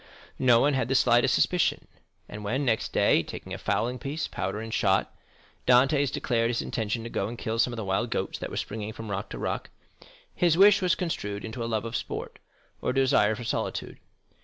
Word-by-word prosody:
No 125 -3 +5
one 145 +3 +3
had 130 -3 0
the 135 - 0
slightest 125 0 +4
suspicion; 180 -2 +1 0.4
and 105 0 -8
when 130 +8 -1
next 115 -3 0
day, - - +3
taking - - -8
a - - -5
fowling 125 +2 -1
piece, 150 +3 -3
powder, 105 - -3
and 110 0 -6
shot, 95 -2 +1 0.5
Dantès 135 +2 +4
declared 115 -4 0
his 120 - -1
intention 115 0 -2
to 115 - -6
go 100 - -1
and 120 +2 -7
kill 115 0 -3
some 120 - +3
of 120 - -6
the 110 - -4
wild 95 0 0
goats - - -2
that - - -5
were - - -6
seen - - -1
springing 110 0 -6
from 110 -1 -7
rock 100 0 -3
to - - -6
rock, - - -3 0.6
his 170 -2 +2
wish 200 +1 +7
was 180 -2 +2
construed 105 - -3
into 115 +2 -5
a 115 - -3
love 110 -1 -1
of 115 +1 -5
sport, - - -5 0.4
or - - -1
a 125 - -1
desire 130 -6 +3
for 120 - -7
solitude. 115 - -3
120 Hz, 215 wpm, -27 LUFS, 110-135 Hz, 0.6 s, wish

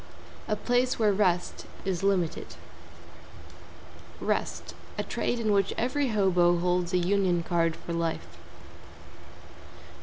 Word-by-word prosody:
A 215 - +1
place 245 +4 +1
where 215 -3 +3
rest 180 -3 0 0.2
is 185 -3 -1
limited. 190 -4 0 1.6
=REST= - - -2 0.2
A - - -1
trade 240 - -2
in 220 -2 +1
which 195 -1 +2
every 270 +4 0
hobo 180 -5 +3
holds 180 0 0
a 180 - +3
Union 180 -1 +2
Card 165 -1 +1
for 170 - -7
life. 165 -1 -3
185 Hz, 115 wpm, -28 LUFS, 175-210 Hz, 1.6 s, where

